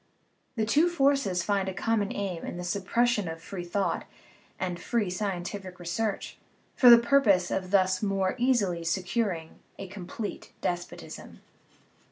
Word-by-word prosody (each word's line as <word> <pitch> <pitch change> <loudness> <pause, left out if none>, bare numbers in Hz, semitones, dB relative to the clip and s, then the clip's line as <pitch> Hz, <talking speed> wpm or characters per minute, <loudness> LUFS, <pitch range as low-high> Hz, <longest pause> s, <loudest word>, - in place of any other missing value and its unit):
The 220 -2 0
two 300 +10 +4
forces 275 - +2
find 195 0 0
a 190 - -6
common 210 0 0
aim 190 -4 -3
in - - -5
the 180 - -5
suppression 210 +3 +1
of 165 0 -5
free 175 +2 -7
thought 190 +3 -1 0.5
and 180 -2 -2
free 220 -6 0
scientific 185 -1 -4
research, 195 +5 -3 0.4
for 250 - +7
the 235 - +11
purpose 235 -8 +3
of 185 -1 -2
thus 185 -1 +3
more 195 -2 0
easily 210 -9 +2
securing 180 -1 -2 0.2
a 195 - -6
complete 190 +3 -7
despotism. 175 0 -5
195 Hz, 140 wpm, -28 LUFS, 180-225 Hz, 0.5 s, the